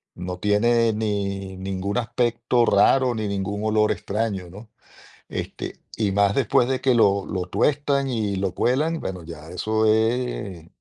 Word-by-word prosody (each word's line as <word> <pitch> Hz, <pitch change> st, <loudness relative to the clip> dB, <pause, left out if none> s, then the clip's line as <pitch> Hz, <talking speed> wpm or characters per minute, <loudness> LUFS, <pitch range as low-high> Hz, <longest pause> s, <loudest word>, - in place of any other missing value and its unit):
No 90 Hz, 0 st, -5 dB
tiene 115 Hz, +2 st, +3 dB
ni 100 Hz, -3 st, -3 dB
ningún 95 Hz, +2 st, -3 dB
aspecto 120 Hz, 0 st, +1 dB
raro 125 Hz, +5 st, +4 dB
ni 110 Hz, -1 st, -2 dB
ningún 100 Hz, +1 st, -3 dB
olor 110 Hz, 0 st, +2 dB
extraño, 100 Hz, -4 st, -3 dB
¿no? 105 Hz, +4 st, -12 dB, 0.6 s
Este, -, -, -5 dB, 0.2 s
y 105 Hz, -3 st, +1 dB
más 100 Hz, 0 st, +3 dB
después 125 Hz, -1 st, +3 dB
de 130 Hz, -1 st, -1 dB
que 130 Hz, -, +3 dB
lo 100 Hz, -4 st, +3 dB
lo 95 Hz, -3 st, -3 dB
tuestan 140 Hz, +4 st, +1 dB
y 110 Hz, -5 st, -1 dB
lo 95 Hz, -1 st, -1 dB
cuelan, 150 Hz, +6 st, +1 dB
bueno, 90 Hz, -2 st, -5 dB
ya 80 Hz, -2 st, -10 dB
eso 110 Hz, +5 st, 0 dB
es 110 Hz, -6 st, 0 dB
105 Hz, 150 wpm, -23 LUFS, 100-120 Hz, 0.6 s, raro